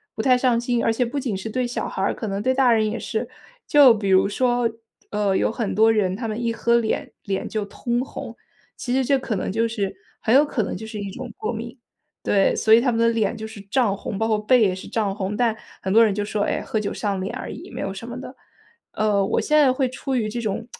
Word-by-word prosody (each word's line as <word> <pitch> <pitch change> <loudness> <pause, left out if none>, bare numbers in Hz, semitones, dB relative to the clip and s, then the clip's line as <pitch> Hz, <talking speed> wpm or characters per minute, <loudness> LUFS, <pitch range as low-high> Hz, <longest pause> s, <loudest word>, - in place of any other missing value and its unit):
不 - - -2
太 255 -2 +4
上 245 -2 +2
心， 240 0 0
而 230 - +3
且 245 +2 0
不 280 +4 -3
仅 240 -7 -2
是 220 +4 -5
对 255 +3 -1
小 240 - -3
孩 - - -4
儿， 195 - +1
可 220 - -5
能 195 0 -2
对 260 +3 +2
大 260 -2 +4
人 220 -1 +2
也 235 - -4
是。 225 +1 -3 0.4
就 280 -5 +7
比 205 -3 -2
如 190 +1 +5
说， 240 +2 +1 0.4
呃， 205 -2 +1
有 - - +2
很 225 -3 -2
多 220 +1 +5
人 200 -4 +1
他 225 +3 -4
们 220 +2 -3
一 230 - +1
喝 235 +1 +1
脸 225 -2 -2
脸 195 -1 -2
就 215 -1 -2
通 240 +4 -2
红， - - -8 0.4
其 245 - -3
实 265 -1 +2
这 275 0 +3
可 240 -4 -3
能 - - -3
就 225 +4 +1
是 210 -4 -2 0.2
很 225 +4 +2
有 285 - +7
可 255 -5 -1
能 - - -4
就 220 +4 -7
是 220 -1 -6
一 200 -1 -4
种 250 +1 -7
过 215 - -3
敏。 235 +3 -7 0.4
对， 195 -1 +2
所 220 0 +4
以 230 - +8
他 250 -1 +2
们 230 - -1
的 230 - +4
脸 225 -1 0
就 220 0 -6
是 220 -2 -11
胀 200 0 +1
红， 200 - -5
包 225 - 0
括 215 -1 +2
背 240 +3 +4
也 190 -3 +3
是 185 - -9
胀 205 -4 -1
红， 200 0 -3
但 230 -1 +1 0.3
很 190 - -2
多 225 +3 +7
人 210 - +1
就 205 +1 -2
说， 205 0 -1
哎， - - -1
喝 220 - -2
酒 205 - -3
上 200 -3 -2
脸 190 - -4
而 - - -6
已， - - -9
没 - - -6
有 195 - -3
什 230 +4 -8
么 245 +1 -6
的。 260 0 -9 0.6
呃， 205 -2 +1
我 200 - 0
现 305 - +2
在 270 -4 +5
会 260 -1 0
出 265 +1 -4
于 220 -4 0
这 240 - -4
种 215 0 -3
225 Hz, 290 characters per minute, -23 LUFS, 205-245 Hz, 0.6 s, 以